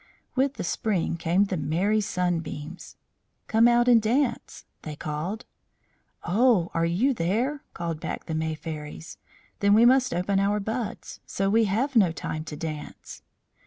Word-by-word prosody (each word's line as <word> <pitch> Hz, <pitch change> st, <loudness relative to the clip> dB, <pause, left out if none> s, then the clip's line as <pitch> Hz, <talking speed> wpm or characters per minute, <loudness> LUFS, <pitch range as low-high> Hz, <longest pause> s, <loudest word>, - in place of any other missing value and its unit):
With 270 Hz, +1 st, +1 dB
the -, -, -4 dB
spring 180 Hz, -1 st, -1 dB
came 170 Hz, +4 st, +2 dB
the 195 Hz, -2 st, -3 dB
merry 175 Hz, +9 st, +1 dB
Sunbeams. 175 Hz, -4 st, -3 dB, 0.5 s
"Come 225 Hz, +1 st, +4 dB
out 240 Hz, 0 st, +4 dB
and 235 Hz, -2 st, +6 dB
dance," 240 Hz, +3 st, -1 dB, 0.2 s
they 155 Hz, -1 st, -7 dB
called. 155 Hz, +8 st, -4 dB, 0.8 s
"Oh! 205 Hz, -2 st, +3 dB
are 165 Hz, 0 st, +1 dB
you 220 Hz, +12 st, +2 dB
there?" 235 Hz, -, -1 dB
called 170 Hz, -2 st, -4 dB
back -, -, -5 dB
the 160 Hz, -, -4 dB
May 160 Hz, 0 st, -1 dB
Fairies. 155 Hz, 0 st, -8 dB, 0.4 s
"Then 200 Hz, 0 st, +4 dB
we 225 Hz, +2 st, +6 dB
must 255 Hz, +1 st, +4 dB
open 195 Hz, +3 st, 0 dB
our 205 Hz, +1 st, +1 dB
buds, 220 Hz, +1 st, -5 dB
so 195 Hz, 0 st, -1 dB
we 225 Hz, +1 st, +4 dB
have 240 Hz, +8 st, -1 dB
no 195 Hz, -7 st, +5 dB
time 155 Hz, -1 st, -5 dB
to 155 Hz, -, -7 dB
dance." 155 Hz, -1 st, -7 dB
195 Hz, 155 wpm, -26 LUFS, 165-230 Hz, 0.8 s, and